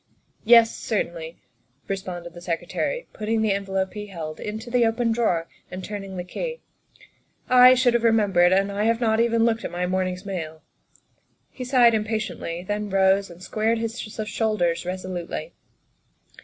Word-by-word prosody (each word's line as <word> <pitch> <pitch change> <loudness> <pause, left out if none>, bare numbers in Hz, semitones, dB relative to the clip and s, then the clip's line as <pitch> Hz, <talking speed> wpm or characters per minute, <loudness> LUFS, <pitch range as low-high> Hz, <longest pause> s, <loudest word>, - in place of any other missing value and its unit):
" - - -42
Yes, 230 0 +6
certainly," 170 -6 -3 0.5
responded 180 -3 -5
the 175 - -11
Secretary, 180 - -3
putting 220 +1 -1
the 215 - +2
envelope 195 -1 -2
he 210 -1 -6
held 160 -5 -7
into 220 +3 -6
the 245 -1 +3
open 230 +1 +1
drawer 200 -8 0 0.2
and 185 0 -7
turning 195 -2 -6
the 180 - -3
key, 480 - -5 0.5
" - - -38 0.2
I 255 - +8
should 250 -1 +3
have 240 -1 +1
remembered, 200 -6 +4
and 195 +1 +2
I 205 +2 -1
have 230 0 +2
not 220 -2 +2
even 230 -1 +3
looked 230 0 0
at - - -3
my 180 +1 -2
morning's 185 +1 -2
mail." 160 -5 -5 0.9
He 255 - -7
sighed 245 -2 +5
impatiently, 215 -5 -3
then 205 +2 -3
rose 195 0 +3
and 175 +1 -13
squared 220 +3 0
his 230 +1 -4
shoulders 215 -5 -1
resolutely. 185 - -5
205 Hz, 160 wpm, -24 LUFS, 180-225 Hz, 0.9 s, I